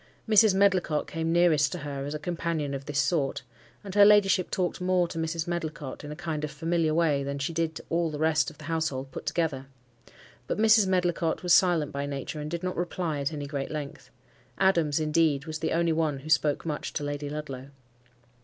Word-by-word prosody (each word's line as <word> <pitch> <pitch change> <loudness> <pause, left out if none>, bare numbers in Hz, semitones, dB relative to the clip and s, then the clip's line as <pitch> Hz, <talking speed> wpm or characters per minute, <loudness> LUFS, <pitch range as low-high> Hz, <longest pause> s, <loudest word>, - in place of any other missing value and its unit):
Mrs. 215 -2 +5
Medlicott 185 -6 +2
came 165 0 -3
nearest 160 -4 +3
to - - -3
her 140 -3 -5
as 145 +2 -4
a - - -1
companion 165 -2 -3
of 135 0 -5
this 145 -1 -3
sort; 140 -4 0 0.4
and 195 -2 -7
her 205 0 +7
ladyship 200 -3 +5
talked 180 -1 -2
more 180 -1 +2
to 165 - -6
Mrs. 160 0 -2
Medlicott, 155 -5 -4
in 150 - -7
a - - -6
kind 155 -2 -4
of 150 - -2
familiar 165 +2 0
way, 155 -3 +2
than 140 +1 -3
she 140 +4 -3
did 165 -1 -1
to - - -8
all 170 0 +1
the 150 - -5
rest 160 0 +2
of 155 - -16
the - - -13
household 155 -4 -2
put - - -8
together. 150 -6 -1 0.8
But - - -2
Mrs. 215 -1 +5
Medlicott 175 -3 0
was 175 -1 +4
silent 170 -6 +4
by 140 0 -3
nature, 140 +2 -5
and 150 0 -5
did 170 +2 -4
not 185 0 -3
reply 170 -3 -2
at 140 +1 -1
any 145 -2 -5
great 140 -1 -4
length. 150 -2 -6 0.5
Adams, 170 -6 +2
indeed, 155 -2 +1
was 155 -1 -5
the 160 - -2
only 170 0 +2
one 155 -4 -1
who 155 - -9
spoke 150 0 +2
much 150 -2 -4
to - - -3
Lady 145 0 -4
Ludlow. 140 -3 -6
160 Hz, 210 wpm, -27 LUFS, 145-175 Hz, 0.8 s, her